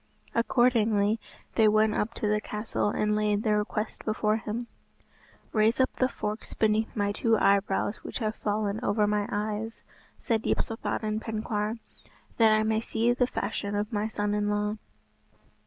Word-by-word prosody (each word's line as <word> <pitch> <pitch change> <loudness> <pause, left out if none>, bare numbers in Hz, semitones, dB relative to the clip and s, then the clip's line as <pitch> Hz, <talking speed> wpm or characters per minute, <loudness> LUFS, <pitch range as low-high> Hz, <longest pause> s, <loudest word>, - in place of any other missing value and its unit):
Accordingly 225 -3 +3 0.3
they 220 -2 +5
went 215 0 +4
up 225 +2 -1
to 215 - -1
the 210 0 +1
castle 210 0 -1
and 210 0 +1
laid 210 0 +1
their 210 -1 +3
request 215 +1 -3
before 215 0 +1
him. 225 +2 -4 0.9
"Raise 220 +2 +3
up 260 - +2
the 255 - +2
forks 210 -2 -5
beneath 220 0 +1
my 205 -2 +1
two 225 +2 +2
eyebrows 200 +1 +2
which - - -6
have 220 -3 -1
fallen 210 0 -1
over 210 -1 +2
my 205 0 0
eyes," 215 +2 -3 0.3
said 225 -4 0
Yspathaden 215 -1 -1
Penkawr, 215 0 -2 0.6
"that 225 -2 +6
I 215 0 +4
may 220 0 +1
see 230 +1 +1
the 250 0 +2
fashion 205 -3 -3
of 210 +2 -2
my 210 0 0
son 205 -1 -1
in 210 0 0
law." 210 +1 0
215 Hz, 155 wpm, -28 LUFS, 210-225 Hz, 0.9 s, that